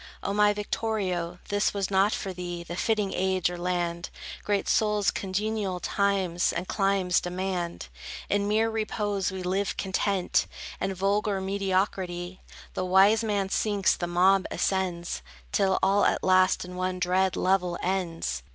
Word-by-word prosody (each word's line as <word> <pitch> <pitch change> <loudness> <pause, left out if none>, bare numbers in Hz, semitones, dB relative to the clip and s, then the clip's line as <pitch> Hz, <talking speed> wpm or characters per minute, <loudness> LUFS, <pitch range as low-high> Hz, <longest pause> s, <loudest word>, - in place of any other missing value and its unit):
O 200 - -1
my 210 0 +4
Victorio, 200 -4 -2
this 205 0 +1
was 200 -1 -1
not 195 +2 +4
for 195 -4 -3
thee 175 -1 -5
The 170 0 -6
fitting 210 0 0
age, 185 -1 +1
or 175 - -5
land. 175 -1 -2 0.3
Great 205 -1 0
souls 210 -2 +2
congenial 200 -1 -2
times 190 -2 +1
and 180 - -4
climes 195 -3 +1
demand. 180 -1 -3 0.4
In 205 0 +1
mere 220 +2 +2
repose 210 -3 -1
we 190 -1 -5
live 190 +2 -1
content, 190 -1 0 0.3
And 195 0 -2
vulgar 200 +1 +1
mediocrity; 190 -2 -2 0.3
The - - -2
wise 195 +4 +5
man 200 -3 0
sinks, 205 -1 +2
the 175 - -3
mob 185 +2 +3
ascends, 180 - -1 0.3
Till 190 -1 +2
all 200 +1 +4
at - - +1
last 185 0 +4
in 180 0 -9
one 185 0 -2
dread 185 +1 +1
level 180 -2 +1
ends. 175 - -2
190 Hz, 145 wpm, -27 LUFS, 180-200 Hz, 0.4 s, wise